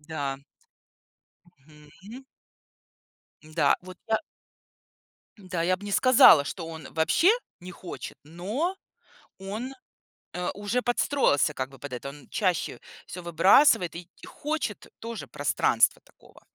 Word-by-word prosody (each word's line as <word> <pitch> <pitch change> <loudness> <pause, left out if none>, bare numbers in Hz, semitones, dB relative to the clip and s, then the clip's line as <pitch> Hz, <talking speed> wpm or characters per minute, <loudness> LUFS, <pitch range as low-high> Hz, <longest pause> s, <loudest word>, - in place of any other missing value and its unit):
Да. 145 -3 -4 1.1
Мгм. 155 - -15 1.2
Да, 155 +1 +2
вот 185 0 -11
я 220 - +3 1.2
Да, 185 -4 -4
я 185 +2 +2
б 190 - -17
не 205 0 -5
сказала, 230 - +7
что 165 +3 -6
он 160 -2 -8
вообще 160 - +3 0.3
не 180 - -9
хочет, 175 0 -8
но 210 - -3 0.6
он, 215 +7 -5 0.6
э, 180 0 -2
уже 205 +5 -2
подстроился 245 - +2
как 130 -2 -4
бы 135 - -16
под 145 -3 -8
это. 125 +2 -5
Он 140 -1 -13
чаще 185 -6 -1 0.3
всё 180 - -7
выбрасывает 175 - +4
и 170 0 -8 0.2
хочет 300 -8 -4
тоже 230 0 -7
пространства - - +2
такого. - - -21
180 Hz, 120 wpm, -27 LUFS, 155-220 Hz, 1.2 s, сказала